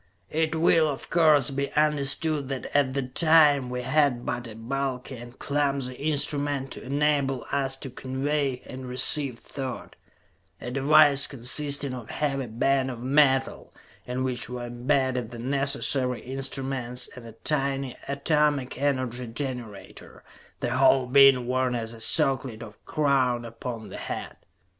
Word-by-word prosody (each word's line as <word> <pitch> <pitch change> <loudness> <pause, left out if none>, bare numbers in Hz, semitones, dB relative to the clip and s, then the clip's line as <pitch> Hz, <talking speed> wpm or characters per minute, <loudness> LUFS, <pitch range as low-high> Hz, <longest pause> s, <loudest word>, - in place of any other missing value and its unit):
It 160 +1 0
will, 160 -1 +4
of 140 -3 -6
course, 155 -5 +4
be 140 +1 -3
understood 150 -1 +1
that 135 0 -5
at 140 -2 +2
that 130 -2 -3
time 150 -5 +4
we 125 0 -4
had 135 -2 +1
but 120 0 -3
a 110 - -9
bulky 130 +2 -4
and 120 +2 -12
clumsy 140 -3 -1
instrument 145 -1 -1
to - - -7
enable 140 -2 0
us 135 -1 -1
to 135 -1 -7
convey 135 +1 -2
and 130 0 -8
receive 130 0 +1
thought; 130 +1 -7 0.6
a 120 - -6
device 140 +1 +5
consisting 140 +2 +1
of 120 -4 -8
a - - -7
heavy 135 -3 -2
band 130 +4 0
of 120 -2 -7
metal, 135 0 +1 0.3
in 125 +1 -2
which 125 -2 -3
were 125 -1 -5
imbedded 125 0 -1
the 120 - -9
necessary 135 0 0
instruments 130 -1 -4
and 125 - -10
a 115 - -11
tiny 135 0 -2
atomic 140 -2 0
energy 130 -3 -1
generator, 115 -6 -7 0.4
the - - -1
whole 130 -1 +4
being 135 -1 +6
worn 130 0 0
as 115 -1 -4
a 115 - -10
circlet 130 -2 +2
or 110 -2 -10
crown 130 -5 +1
upon 115 -1 -7
the - - -8
head. - - -6
135 Hz, 145 wpm, -26 LUFS, 125-140 Hz, 0.6 s, being